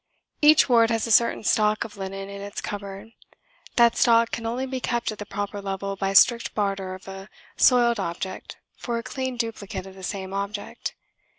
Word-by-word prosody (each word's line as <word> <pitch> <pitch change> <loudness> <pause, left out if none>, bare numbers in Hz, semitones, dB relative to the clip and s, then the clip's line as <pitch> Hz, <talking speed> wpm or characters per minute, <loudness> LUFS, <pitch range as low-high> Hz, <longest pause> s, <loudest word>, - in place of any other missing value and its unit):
Each 305 +1 +6
ward 230 -3 +5
has 225 -1 0
a 230 - -3
certain 235 +1 +4
stock 215 0 +2
of 215 -2 -10
linen 195 0 -6
in 200 0 -8
its 200 0 -6
cupboard. 200 +1 -7 0.6
That 235 -1 +5
stock 230 -2 +4
can 230 -1 -3
only 245 +3 -2
be 260 0 -4
kept 240 -2 -1
at 215 - -9
the 205 - -6
proper 205 0 -4
level 195 0 -4
by 195 0 -2
strict 235 +4 +4
barter 195 -2 -2
of 185 - -14
a 195 +1 -9 0.3
soiled 240 -3 +4
object 185 +1 -5 0.2
for 235 -2 -3
a 230 - -4
clean 260 0 -4
duplicate 225 -5 -4
of 190 - -11
the 190 - -13
same 190 0 -5
object. 200 +1 -4
210 Hz, 190 wpm, -25 LUFS, 195-235 Hz, 0.6 s, Each